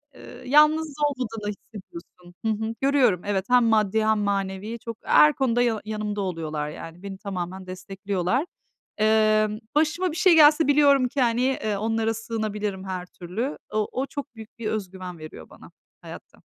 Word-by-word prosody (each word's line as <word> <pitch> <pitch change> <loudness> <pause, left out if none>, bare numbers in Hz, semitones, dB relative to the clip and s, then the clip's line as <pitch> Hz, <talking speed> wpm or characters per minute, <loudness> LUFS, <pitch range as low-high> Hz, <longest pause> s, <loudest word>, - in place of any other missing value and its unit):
eee, 245 +1 -12
yalnız 305 +3 +4
olmadığını 230 -7 -3
hissediyorsun. 180 -4 -13
Hı - - +2
hı, 220 +1 -3
görüyorum 265 -10 +3
evet, 200 -2 -1
hem 250 0 +5
maddi 220 -1 +2
hem 220 0 +3
manevi 200 +2 -2
çok. 230 0 -7
Her 300 0 +6
konuda 245 -3 +1
ya 230 -3 +1
yanımda 210 -1 -3
oluyorlar, 155 -5 -3
yani. 165 +4 -10
Beni 195 -1 -7
tamamen 190 -1 -6
destekliyorlar. 195 - -2 0.5
Emm, 215 0 +3 0.2
başıma 320 +4 +1
bir - - -7
şey 370 -4 +5
gelse 305 0 +6
biliyorum 280 -2 +4
ki, 270 +2 -2
hani, 235 -1 +2
eee, 250 -5 0
onlara 225 +1 0
sığınabilirim 210 -3 -4
her 185 -2 -4
türlü. 190 - -5 0.2
O 215 -1 0
o 260 - -2
çok 285 -3 -8
büyük 225 +1 -13
bir 225 - -3
özgüven 185 -4 -5
veriyor 155 0 -11
bana - - -15 0.3
hayatta. - - -12
215 Hz, 160 wpm, -24 LUFS, 190-250 Hz, 0.5 s, Her